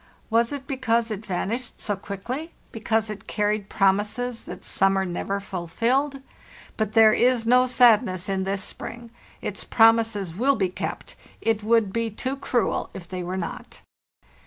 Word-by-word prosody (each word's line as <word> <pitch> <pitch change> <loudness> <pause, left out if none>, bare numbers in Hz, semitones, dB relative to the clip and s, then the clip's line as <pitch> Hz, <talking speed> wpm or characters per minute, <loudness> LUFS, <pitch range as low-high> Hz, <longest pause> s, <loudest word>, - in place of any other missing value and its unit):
Was 230 +2 +3
it 280 -2 -5
because 235 -4 0
it 215 +1 -6
vanished 220 +6 -3
so 205 - -2
quickly, 235 - -6 0.2
because 220 -1 -1
it 205 -2 -9
carried 210 -1 -1
promises 210 +5 0
that - - -9
summer 195 0 +2
never 190 +2 -3
fulfilled? 235 - -1 0.5
But 215 -1 -2
there 220 -1 +7
is 245 -1 +3
no 250 +2 +5
sadness 230 -7 +4
in 190 -1 -1
this 195 0 -2
spring; 235 +2 -5 0.3
its - - -3
promises 225 -6 +3
will 270 +7 +3
be 190 -4 0
kept; 180 - -6 0.2
it 225 -1 0
would 220 -3 +2
be 230 0 0
too 255 +5 -3
cruel 250 -3 -1
if 175 -3 -8
they 185 +1 -5
were 180 +2 -4
not." 170 -3 -6
220 Hz, 155 wpm, -24 LUFS, 195-240 Hz, 0.5 s, there